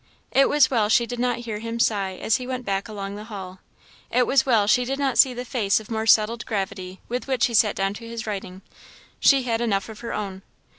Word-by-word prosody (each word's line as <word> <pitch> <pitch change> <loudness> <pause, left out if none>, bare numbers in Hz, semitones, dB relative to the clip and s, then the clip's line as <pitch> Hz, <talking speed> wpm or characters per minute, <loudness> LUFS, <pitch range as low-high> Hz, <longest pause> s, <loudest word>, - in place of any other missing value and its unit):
It 275 - +4
was 290 -2 +4
well 220 -5 +2
she 235 +2 +4
did 245 0 -6
not 245 -1 0
hear 215 -2 -4
him 230 +1 -5
sigh 195 -4 +1
as 220 - +1
he 250 -1 -7
went 255 -1 -4
back 195 +1 -2
along 200 -2 -6
the 210 +1 -8
hall 190 -4 -8 0.5
it 250 +1 +2
was 265 +1 +2
well 225 -5 +4
she 250 +4 +3
did 270 +2 -3
not 275 -3 0
see 265 - +7
the 245 0 -6
face 215 -6 +1
of 220 +1 -13
more 220 0 -2
settled 225 +2 +4
gravity 190 -3 -4
with 245 +3 -4
which 260 -3 +2
he 240 - -3
sat 215 -1 +3
down 195 0 -1
to 230 +2 -10
his 230 -1 -6
writing 195 -3 -6 0.6
she 275 -2 +5
had 230 -2 -1
enough 205 -3 -1
of 220 - -10
her 235 - -6
own. 195 -2 -5
225 Hz, 240 wpm, -24 LUFS, 200-245 Hz, 0.6 s, see